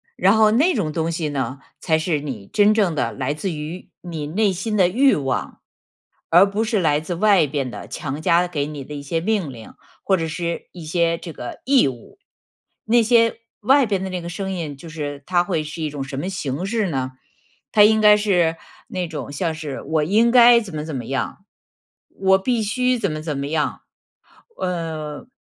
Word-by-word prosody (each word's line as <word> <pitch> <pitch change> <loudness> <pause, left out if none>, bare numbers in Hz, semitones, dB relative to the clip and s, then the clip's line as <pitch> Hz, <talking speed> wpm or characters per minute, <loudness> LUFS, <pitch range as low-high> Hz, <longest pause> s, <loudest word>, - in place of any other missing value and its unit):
然 195 +3 +4
后 215 -1 +5
那 305 +11 +3
种 160 -9 -1
东 165 0 -1
西 165 -2 -2
呢， 135 -1 -3 0.2
才 160 - +2
是 160 -3 -1
你 120 -9 -6
真 210 +1 +4
正 200 -6 +2
的 - - 0
来 135 +2 -2
自 180 +5 -3
于 155 +3 -7
你 160 -4 -5
内 195 +4 +1
心 210 +4 -2
的 180 -2 +5
欲 265 +9 +4
望， 135 -3 -3 0.7
而 185 +4 +6
不 210 +3 -1
是 220 -2 0
来 150 -4 +2
自 170 +3 -5
外 200 -3 +4
边 135 -2 -2
的 105 - -8
强 145 +2 -5
加 170 +2 +3
给 150 -5 -2
你 145 -3 -7
的 150 - -9
一 145 - -6
些 165 +4 -1
命 190 -5 -1
令， 115 -3 -12 0.3
或 190 - +3
者 165 -2 -2
是 170 +1 -4
一 175 -3 -10
些 170 0 +1
这 165 -2 -9
个 120 - -8
义 270 - +4
务。 125 - -8 0.7
那 235 +1 +4
些 230 0 +3 0.2
外 270 +5 +4
边 195 -2 -1
的 190 - -4
那 180 -1 -3
个 170 - -6
声 190 +2 -4
音 165 -6 -4
就 165 - -11
是 145 -3 -6
它 175 -1 +2
会 170 -4 -1
是 155 +2 -7
一 155 - -1
种 145 -2 -5
什 135 0 -7
么 175 +7 -3
形 155 -5 -3
式 215 -3 0
呢？ 130 -3 -3 0.6
它 210 - +4
应 220 +1 +5
该 210 0 +8
是 175 -6 +1 0.3
那 180 -1 -3
种 155 -3 -6
像 165 +2 -2
是， 155 -3 -6
我 155 -1 0
应 215 +9 +3
该 240 -1 +8
怎 190 -7 -8
么 150 0 -4
怎 155 -3 -5
么 125 - -4
样， 135 +7 -3 0.7
我 190 0 +3
必 235 +3 0
须 250 +3 0
怎 200 -6 -1
么 155 - -4
怎 155 -2 -3
么 140 - -3
样， 150 0 -1 0.8
呃， 160 -1 -4
170 Hz, 220 characters per minute, -21 LUFS, 150-205 Hz, 0.8 s, 该